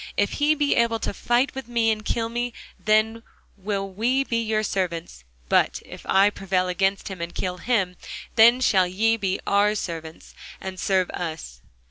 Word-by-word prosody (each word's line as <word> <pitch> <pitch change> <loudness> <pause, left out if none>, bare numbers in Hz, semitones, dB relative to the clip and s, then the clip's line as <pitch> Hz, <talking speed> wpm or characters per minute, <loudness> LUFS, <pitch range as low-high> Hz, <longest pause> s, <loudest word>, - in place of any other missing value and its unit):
If 205 - +2
he 300 +1 +4
be 290 -1 +1
able 235 -1 +2
to 220 - -3
fight 240 +6 +1
with 265 -3 -7
me, 235 -2 +2
and 215 0 -3
to - - -2
kill 230 -1 0
me, 240 +1 -3 0.3
then 215 +1 +2 0.3
will 195 0 -3
we 235 +8 0
be 230 -3 -1
your 215 -1 0
servants: 170 - -3 0.2
but - - +2
if - - -11
I 195 +2 +4
prevail 190 -2 -1
against 195 +2 0
him, 190 -3 -7
and 170 0 -5
kill 180 -1 -3
him, 190 -4 0 0.4
then 235 +3 +6
shall 190 -7 +4
ye 220 +5 +2
be 195 -3 -2
our 205 +1 +3
servants, 165 -4 -6 0.3
and 190 -1 -7
serve 190 -2 +1
us. 155 - -6
205 Hz, 180 wpm, -24 LUFS, 185-230 Hz, 0.4 s, then